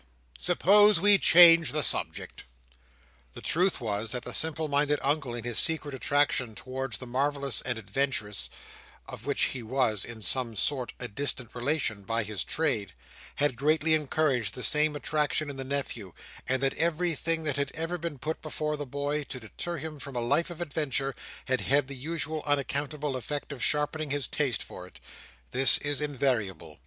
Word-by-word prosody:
suppose 205 - +5
we 205 +2 +5
change 165 -2 +7
the 155 -1 +1
subject." - - 0 0.9
The - - -7
truth 180 +3 +1
was, 110 -1 -3
that 125 -1 -4
the 125 - -6
simple 160 0 +1
minded 145 0 +1
Uncle 140 -4 -1
in 120 - -5
his 120 -1 +1
secret 155 -3 +2
attraction 135 -3 0
towards 130 -1 -5
the 130 - -8
marvellous 140 0 0
and 120 - -3
adventurous—of 115 -2 -4
which - - +2
he 130 - -5
was, 115 -3 0
in 115 -2 -8
some 115 +3 0
sort, 130 +3 -2
a 125 - -4
distant 125 +1 -2
relation, 120 -4 -1
by 115 +3 -1
his 105 -2 -3
trade—had 100 - -2
greatly 155 +4 +2
encouraged 140 -8 0
the 125 - -5
same 150 0 +3
attraction 150 0 -1
in 135 - -9
the 135 - -4
nephew; 130 -9 -4 0.4
and 130 +1 0
that 135 - +2
everything 165 -1 0
that 150 -3 -1
had 140 -1 -1
ever 165 +2 -3
been 165 -3 -5
put 155 +5 -4
before 155 -1 -3
the 145 -1 -5
boy 145 +3 -2
to 130 - -7
deter 170 +9 -6
him 155 0 -7
from 140 -2 -7
a - - +1
life 145 +9 +1
of 175 - -8
adventure, 140 -4 -2 0.3
had 130 -1 0
had 140 0 +2
the 140 - -7
usual 155 +2 -4
unaccountable 145 0 -1
effect 145 +5 -4
of 135 -4 -5
sharpening 150 +1 0
his 145 0 0
taste 130 -8 -1
for 90 - -10
it. - - -16 0.5
This 135 +1 +8
is 145 -1 -1
invariable. 110 - -2
140 Hz, 170 wpm, -28 LUFS, 125-155 Hz, 0.9 s, This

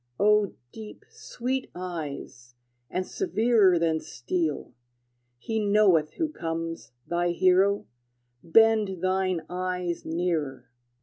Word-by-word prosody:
O 210 -1 +3 0.2
deep, 215 -1 -11
sweet 255 +2 -4
eyes, 145 -8 -7 0.3
and 185 - -2
severer 210 -1 +3
Than 165 -1 +1
steel! 155 +3 -3 0.6
he 220 - -2
knoweth 200 -7 +3
who 325 - -1
comes, 165 - -5
Thy 175 0 0
hero: 185 +3 +3 0.6
bend 205 0 +3
thine 185 -2 +1
eyes 180 -1 -3
nearer! 155 -7 -2
180 Hz, 100 wpm, -26 LUFS, 165-205 Hz, 0.6 s, O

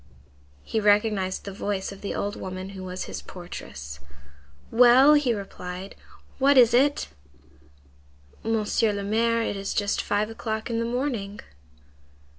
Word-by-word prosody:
He 220 - -1
recognized 205 -2 +2
the 200 - -6
voice 200 -1 -3
of 195 - -11
the 200 - -4
old 205 +1 -2
woman 185 0 -6
who 190 -1 -8
was 185 0 -5
his - - -6
portress. 70 - -9 0.7
"Well!" 250 +5 +7
he 290 -4 +3
replied, 195 -2 -6 0.5
"what 275 +1 +5
is 240 -2 +7
it?" 280 +4 +3 1.4
"Monsieur 220 -1 +1
le 200 0 -3
Maire, 230 +3 +1
it 205 - -2
is 195 0 -4
just 205 -1 0
five 210 +2 -1
o'clock 220 0 -4
in 230 - 0
the 230 - -1
morning." 235 -5 -3
210 Hz, 140 wpm, -25 LUFS, 195-230 Hz, 1.4 s, Well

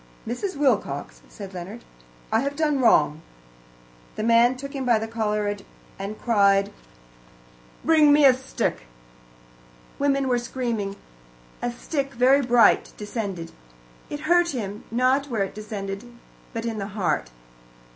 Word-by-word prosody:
"Mrs. 310 - -3
Wilcox," 280 -2 0
said 200 -3 -9
Leonard, 190 +6 -8 0.5
"I - - +3
have 280 +1 -2
done 300 -2 +1
wrong." 160 - +4 0.9
The 215 - -3
man 235 +2 +4
took 275 +2 -7
him 270 -2 -3
by 240 -3 +4
the 220 +1 -3
collar 210 -2 -1 0.4
and 200 +2 -5
cried, 200 -3 +3 1.1
"Bring 310 -2 +6
me 290 0 +6
a 265 - +8
stick." 260 - -3 1.1
Women 275 -1 +1
were 245 -1 +2
screaming. 235 -5 -3 0.7
A 245 - -1
stick, 275 +2 -4
very 260 +4 +5
bright, 240 -2 +4
descended. 200 -6 -5 0.6
It 295 - -5
hurt 345 +1 +3
him, 210 -3 -5
not 255 +4 +2
where 225 -7 0
it 195 - -5
descended, 210 +1 -6 0.4
but 230 -2 -4
in 225 -2 -3
the 195 - -3
heart. 175 - 0
235 Hz, 135 wpm, -24 LUFS, 205-275 Hz, 1.1 s, a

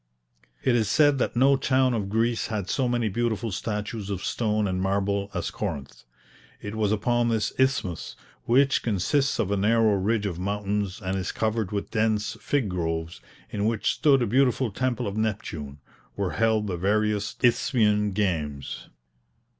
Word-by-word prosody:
It 125 - +3
is 110 -4 +1
said 145 0 +4
that - - -1
no 135 +3 +5
town 130 -1 +2
of 105 -4 -2
Greece 115 +2 0
had 105 -4 -3
so 130 -2 +1
many 120 -2 0
beautiful 115 +1 -1
statues 105 +1 -4
of 95 -3 -3
stone 105 -2 0
and 95 -1 -1
marble 100 +1 0
as 90 - -2
Corinth. 70 -1 -5 0.5
It 105 - -6
was 110 -2 0
upon 120 +3 +1
this 110 -2 0
isthmus, 130 -10 0 0.3
which 135 +3 +3
consists 130 - +1
of 100 - -1
a 100 - +1
narrow 110 +2 +3
ridge 105 +2 0
of 90 -4 -3
mountains, 100 +1 -2
and 95 +1 -1
is 95 -1 -2
covered 110 -2 -1
with 100 -1 -3
dense 110 -1 0
fig 140 -6 0
groves, 80 -2 -3 0.3
in 105 0 -1
which 110 -1 +1
stood 135 -4 +3
a - - +2
beautiful 125 +1 +2
temple 125 +2 -1
of 100 +1 -4
Neptune, 85 -10 -3 0.4
were 100 -3 -1
held 110 -2 +1
the 95 -4 -3
various 105 +2 0
Isthmian 110 -4 +3
games. 80 -9 -2
105 Hz, 160 wpm, -26 LUFS, 100-120 Hz, 0.5 s, no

